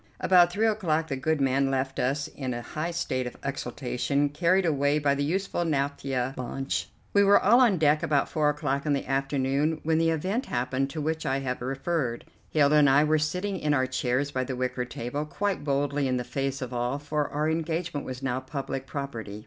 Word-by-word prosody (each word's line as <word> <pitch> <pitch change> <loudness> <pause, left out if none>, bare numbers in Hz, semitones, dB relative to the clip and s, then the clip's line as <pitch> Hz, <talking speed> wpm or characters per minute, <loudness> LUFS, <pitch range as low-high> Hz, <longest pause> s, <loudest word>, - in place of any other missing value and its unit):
About 175 -2 +5
three 210 +5 +1
o'clock 165 -8 +1
the 135 - -1
good 155 +3 0
man 135 0 +2
left 135 0 -1
us 140 +3 0
in 130 -3 -5
a 120 - -5
high 155 +7 -3
state 130 -7 -2
of 125 - -8
exultation, 140 +1 -1
carried 175 +5 +2
away 145 -2 +2
by 145 -2 +2
the 140 0 -1
useful 175 +3 -1
naphtha 135 -4 -1
launch. 135 +2 -3 0.2
We 200 - +5
were 200 0 +6
all 235 +6 +5
on 225 -7 +4
deck 150 -1 +3
about 145 -2 +1
four 150 -2 +1
o'clock 145 -1 -1
in 145 - +3
the 140 - -1
afternoon 135 +3 0
when 160 0 +2
the 165 0 +3
event 185 - -1
happened 130 +2 -1
to 155 +2 -4
which 160 +1 -2
I 135 - 0
have 125 -2 -3
referred. 135 -1 -2 0.2
Hilda 150 -1 +4
and 145 -2 +6
I 140 +2 +5
were 155 0 +2
sitting 180 +5 -2
in 150 -1 +1
our 130 -2 +2
chairs 130 +2 -1
by 130 -2 -1
the 130 0 -4
wicker 125 0 -2
table, 125 +4 -4
quite 190 +4 -2
boldly 140 0 0
in 130 -1 0
the 125 - -2
face 135 +1 -3
of 125 0 -6
all, 120 +3 -1
for 145 0 -2
our 150 +1 -1
engagement 160 -1 -2
was 130 +1 -7
now 130 -1 0
public 135 0 -5
property. 115 -8 -5
140 Hz, 205 wpm, -27 LUFS, 130-160 Hz, 0.2 s, were